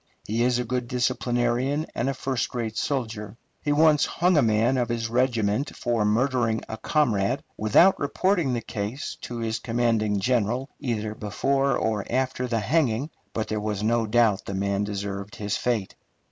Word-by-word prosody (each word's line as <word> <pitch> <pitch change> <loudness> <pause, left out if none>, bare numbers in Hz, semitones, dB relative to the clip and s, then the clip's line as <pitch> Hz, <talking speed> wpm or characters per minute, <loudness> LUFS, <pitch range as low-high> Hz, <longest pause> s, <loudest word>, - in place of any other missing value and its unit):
He 110 +3 -1
is 125 0 +3
a 125 - 0
good 125 0 -2
disciplinarian 125 +3 0
and 125 - -1
a 135 - -2
first 130 -1 -2
rate 115 -2 -2
soldier. 110 -6 -3 0.2
He 145 - -1
once 150 0 +4
hung 180 +1 +2
a 150 - +5
man 115 +2 +2
of 120 -1 0
his 115 -1 -2
regiment 120 -1 +1
for 120 -3 0
murdering 115 0 +1
a 110 - -5
comrade, 120 -2 +1
without 110 - +4
reporting 170 -1 +1
the 120 - -1
case 110 +5 -4
to 120 - -6
his 115 -1 -2
commanding 115 -3 +1
general 125 +4 0
either 110 -5 -2
before 135 +6 0
or 110 -2 0
after 130 0 0
the 115 -2 0
hanging, 140 0 +1 0.2
but 110 - -2
there 105 -1 -2
was 105 -1 -2
no 115 0 +2
doubt 110 -3 +3
the 100 - -4
man 100 +1 0
deserved 100 0 -4
his 100 -1 -2
fate. 115 -6 -1
120 Hz, 170 wpm, -25 LUFS, 110-130 Hz, 0.2 s, a